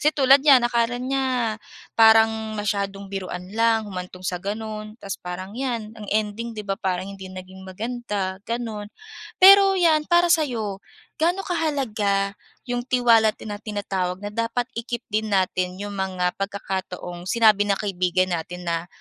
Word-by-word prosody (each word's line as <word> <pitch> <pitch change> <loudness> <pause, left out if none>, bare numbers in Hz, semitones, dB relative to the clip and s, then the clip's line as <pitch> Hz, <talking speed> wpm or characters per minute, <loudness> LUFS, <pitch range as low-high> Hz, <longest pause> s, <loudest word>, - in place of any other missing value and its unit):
Kasi 300 - +4
tulad 275 0 +6
niyan 270 -4 +6
akala 240 0 +1
niya 255 -3 -1 0.4
parang 220 -1 +4
masyadong 200 -1 -2
biruan 185 -1 -5
lang, 225 -1 +2
humantong 185 -2 -8
sa 180 -1 -2
gano'n 215 +1 -5
tapos 195 -3 -5
parang 180 +2 -6
'yan 235 -4 -3
ang 215 -2 -9
ending 220 +2 -2
'di 210 - -5
ba, 195 - 0
parang 185 -1 -1
hindi 195 -1 -9
naging 185 0 -10
maganda, 205 -2 -4
gano'n. 225 -3 -4 0.5
Pero 390 +1 +8
'yan, 315 -4 +3
para 345 0 +5
sa'yo, 225 -11 -1 0.4
ga'no 355 +4 +1
kahalaga 225 - 0 0.4
'yong 245 0 -2
tiwala 235 -3 +5
tina 205 -1 -7
na - - -29
tinatawag 195 -3 -3
na 205 - -3
dapat 230 +2 -1
i-keep 235 0 -4
din 215 0 0
natin 185 -1 0
'yong 205 0 -5
mga 185 -2 -1
pagkakataong 190 -3 -4
sinabi 215 -2 +4
na 200 - +2
kaibigan 185 -2 0
natin 175 +1 -4
na 170 0 -1
215 Hz, 150 wpm, -23 LUFS, 190-240 Hz, 0.5 s, Pero